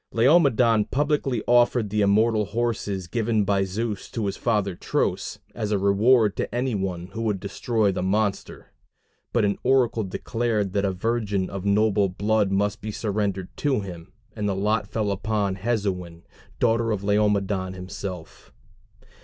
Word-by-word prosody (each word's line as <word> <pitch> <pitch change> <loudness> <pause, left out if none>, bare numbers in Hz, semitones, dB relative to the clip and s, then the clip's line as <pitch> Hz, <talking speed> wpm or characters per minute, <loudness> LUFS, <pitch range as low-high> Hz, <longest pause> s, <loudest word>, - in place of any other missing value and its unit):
Laomedon 120 -4 +4
publicly 140 -5 0
offered 120 -3 +3
the 105 0 +1
immortal 105 +2 +3
horses 105 -3 -2
given 110 +2 0
by 100 0 +2
Zeus 105 +2 -3
to 115 -3 -3
his 100 0 -2
father 105 -5 0
Tros, - - -2 0.2
as 105 - -3
a 105 - +2
reward 105 +3 +3
to - - -3
any 125 0 0
one 95 -3 -3
who 115 - -4
would 105 -4 -1
destroy 105 +2 0
the 90 - -3
monster. 100 +2 -2 0.6
But 120 -3 +2
an 100 - 0
oracle 125 -4 +2
declared 105 0 -2
that 100 0 +1
a 95 - +1
virgin 100 -1 -1
of 100 -1 -5
noble 100 -1 +3
blood 105 +2 +1
must 100 +2 0
be 110 - -5
surrendered 100 -3 -2
to 135 -6 +1
him, 90 -4 -9 0.2
and 105 -2 -1
the 95 - -1
lot 105 +1 0
fell 105 -1 -1
upon 100 -1 -1
Hesione, 95 -6 -2 0.4
daughter 115 -1 +2
of 105 -3 -1
Laomedon 100 -2 +1
himself. 90 -1 -8
105 Hz, 155 wpm, -24 LUFS, 95-115 Hz, 0.6 s, Laomedon